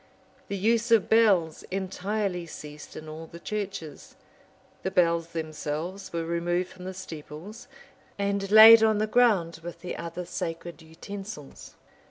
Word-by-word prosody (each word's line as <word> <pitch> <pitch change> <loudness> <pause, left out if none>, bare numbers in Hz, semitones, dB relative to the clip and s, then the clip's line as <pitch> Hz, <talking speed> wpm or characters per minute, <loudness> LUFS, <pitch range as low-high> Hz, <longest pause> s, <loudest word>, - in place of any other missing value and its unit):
The 200 - -3
use 230 +4 +1
of 225 -4 +4
bells 195 -8 +3
entirely 190 -1 -2
ceased 150 -1 -10
in 155 - -8
all 160 +1 -8
the 170 - -11
churches: 195 -8 -6 0.7
the - - -2
bells 170 -3 +2
themselves 160 +3 -5
were 165 -1 -2
removed 175 +2 -1
from 185 -1 -12
the 190 - -5
steeples, 165 +3 -9 0.5
and 200 -1 -1
laid 220 +2 +10
on 220 -1 +4
the 215 - +1
ground 210 -8 +2
with 170 +1 -8
the 180 - -5
other 170 +1 -6
sacred 170 -1 -5
utensils. 165 0 -9
180 Hz, 140 wpm, -27 LUFS, 165-205 Hz, 0.7 s, laid